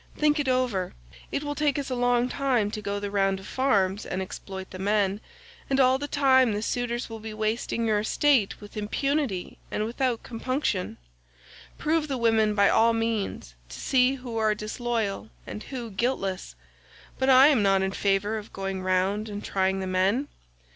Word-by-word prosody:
Think 300 0 +3
it 290 - -1
over. 250 -8 0 0.4
It 285 - -2
will 290 0 -2
take 290 -1 +1
us 280 -2 -3
a - - 0
long 245 0 +2
time 250 -6 0
to 215 - -5
go 205 -1 -3
the 200 0 -4
round 195 -1 +1
of 190 - -12
the - - -9
farms 205 -7 +1
and 185 - -4
exploit 190 0 -7
the 185 - -8
men, 200 0 +1 0.5
and 270 0 +1
all 260 0 +4
the 290 - -4
time 260 -5 +4
the 210 +1 -2
suitors 240 0 -2
will 225 -1 -8
be 220 0 -7
wasting 220 +1 -1
your 215 -2 +2
estate 235 0 +2
with 205 -1 -13
impunity 220 -1 -2
and 210 - -1
without 240 +1 -1
compunction. 245 -5 -2 0.8
Prove 310 0 0
the 270 -3 -2
women 220 -3 +2
by 200 -1 +5
all 230 +1 +4
means, 225 - -2 0.2
to - - -9
see 260 0 +3
who 250 -3 -6
are 215 -1 +2
disloyal 220 -1 -3 0.2
and 210 - -7
who 240 -4 -6
guiltless, 195 - -2 0.6
but 265 0 +2
I 265 +2 +8
am 270 -8 +3
not 195 -1 +3
in 190 - -1
favour 200 +2 0
of 210 - -12
going 195 -1 -4
round 190 +3 0
and 205 0 -6
trying 190 0 0
the - - -3
men. 190 +9 +1
220 Hz, 185 wpm, -26 LUFS, 200-255 Hz, 0.8 s, I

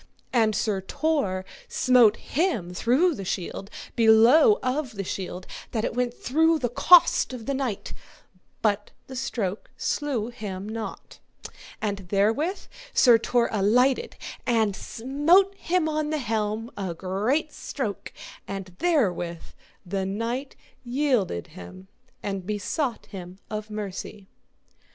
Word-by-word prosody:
And 220 -3 +3
Sir 205 -2 0
Tor 195 -6 -1 0.2
smote 245 -4 +5
him 255 - -1
through 265 - +3
the 200 - -6
shield 190 +1 -4 0.3
below 235 - +6
of 255 0 -1
the 195 - -3
shield 185 0 -5 0.3
that 220 -2 0
it - - -2
went 245 0 0
through 320 +7 +2
the 250 -5 -1
cost 340 +2 +5
of 235 -3 -7
the 280 - -1
knight, 260 -7 -3 0.7
but 205 -1 +1 0.2
the 265 - -9
stroke 220 -6 -3
slew 260 -7 -1
him 205 -5 -6
not. 220 0 -7 0.6
And 200 -2 -1
therewith 225 - +1 0.3
Sir 240 -3 +7
Tor 235 +1 +2
alighted 250 - +2 0.3
and 220 -4 +2
smote 295 - +2
him 360 -3 0
on 305 -1 -1
the 310 - 0
helm 220 -2 -2
a 185 -4 -4
great 215 - -1
stroke, 220 -8 -5 0.4
and 195 -2 -6
therewith 185 - +1 0.4
the 190 +2 -2
knight 230 +7 -3 0.3
yielded 245 - 0
him 185 - -11 0.3
and 195 -2 -3
besought 225 +5 -2
him 185 -2 -9
of 215 0 -4
mercy. 205 -1 -6
225 Hz, 125 wpm, -26 LUFS, 200-275 Hz, 0.7 s, Sir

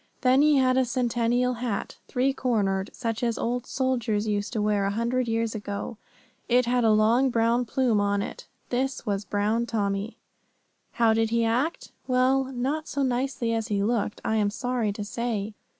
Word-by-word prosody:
Then 260 +1 +4
he 300 -1 +5
had 255 -1 +3
a - - +4
Centennial 245 0 +1
hat, 230 -5 -3
three 260 +2 +1
cornered, 205 -7 0
such 230 -1 -3
as 235 -2 0
old 245 +1 -2
soldiers 235 -5 0
used 205 0 -1
to 220 - -1
wear 210 -1 +1
a - - +1
hundred 240 +2 0
years 225 -1 0
ago; 205 +1 -5 0.5
it 250 0 +4
had 245 0 +1
a 225 - +4
long 225 +5 +4
brown 235 +1 +2
plume 235 -3 +1
on 200 0 +1
it. - - -8 0.2
This 265 +2 -1
was 200 -2 -2
Brown 215 +3 0
Tommy. 200 0 -2 0.8
How 230 -2 +3
did 225 0 +1
he 230 0 +1
act? 250 +9 -1 0.2
Well, 260 +1 +3
not 270 +4 -3
so 280 0 -1
nicely 250 -2 -1
as 225 -1 -1
he 200 -1 0
looked, 220 -1 -1
I 220 - +1
am 205 -1 +2
sorry 245 -1 -1
to 205 +1 -5
say. 220 -1 -3
235 Hz, 180 wpm, -26 LUFS, 215-255 Hz, 0.8 s, he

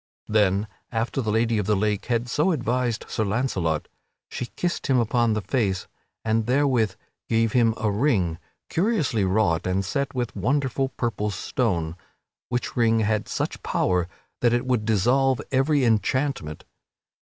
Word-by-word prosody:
Then, 105 -1 +2 0.2
after 115 +3 -1
the 110 - -2
Lady 115 0 +2
of 100 - -2
the 105 - +3
Lake 105 0 0
had 120 0 0
so 150 +9 +2
advised 125 -3 -1
Sir 110 - -1
Launcelot, 100 - -1 0.4
she 125 - -4
kissed 175 -1 -2
him 135 - +3
upon 115 0 +2
the 105 -1 -2
face, 100 -8 0 0.4
and 110 0 +1
therewith 125 -5 +2 0.3
gave 115 -1 +2
him 115 -2 +3
a 105 - 0
ring 100 - +1 0.3
curiously 165 - +1
wrought 95 -4 +1
and 95 +1 0
set 140 +7 -2
with 120 -2 -2
a - - -5
wonderful 135 +4 0
purple 115 -4 -2
stone, 95 -5 -1 0.5
which 125 0 -2
ring 115 -2 +3
had 110 0 0
such - - -3
power 90 -2 +1 0.3
that 120 -1 +3
it 120 +1 +1
would 125 -4 0
dissolve 125 +5 +3
every 135 +1 +3
enchantment. 115 - 0
115 Hz, 155 wpm, -24 LUFS, 105-130 Hz, 0.5 s, the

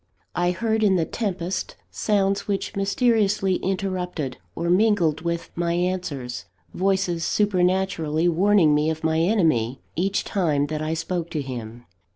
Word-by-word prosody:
I 175 0 +1
heard 220 +5 0
in 195 -3 +4
the 165 -3 +1
tempest 190 -4 -3 0.2
sounds 200 -1 0
which 200 -1 -2
mysteriously 200 -2 +2
interrupted, 180 -7 -3 0.2
or 170 - -2
mingled 180 -5 +3
with, 170 0 -3
my 170 0 -1
answers, 170 -8 -2 0.3
voices 185 -3 0
supernaturally 180 -5 +1
warning 175 -2 +4
me 150 +1 +2
of 160 0 -3
my 160 0 +2
enemy, 160 - +2 0.2
each 190 +4 0
time 155 -7 +1
that 155 - -2
I 155 +1 -1
spoke 170 +1 -3
to 155 -3 -2
him. 120 -2 -7
175 Hz, 140 wpm, -24 LUFS, 160-195 Hz, 0.3 s, in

